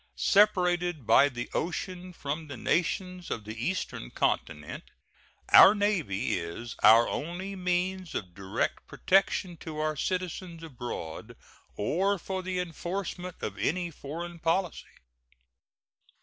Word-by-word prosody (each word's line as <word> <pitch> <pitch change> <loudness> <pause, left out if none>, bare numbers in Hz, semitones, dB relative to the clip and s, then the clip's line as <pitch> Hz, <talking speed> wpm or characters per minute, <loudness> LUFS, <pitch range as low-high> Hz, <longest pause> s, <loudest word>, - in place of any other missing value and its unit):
Separated 180 - +3
by 140 +5 +6
the 120 -3 -5
ocean 180 +1 -3
from 155 -1 -5
the 140 -3 -7
nations 180 +5 -1
of 110 - -3
the 110 +1 -6
Eastern 185 - -3
Continent, 75 -3 -2 0.6
our 200 - +9
Navy 195 - 0
is 85 +8 -6
our 110 +3 +8
only 180 +5 -4
means 180 0 -1
of 90 -4 -4
direct 95 +1 -3
protection 190 -2 +1
to 160 -2 -8
our 155 0 0
citizens 180 0 -3
abroad 120 - -6 0.4
or 190 - +1
for 190 +1 -4
the 185 0 -3
enforcement 180 +1 -4
of 100 -2 -4
any 170 - 0
foreign 170 +4 -7
policy. 170 +2 0
175 Hz, 120 wpm, -29 LUFS, 135-185 Hz, 0.6 s, our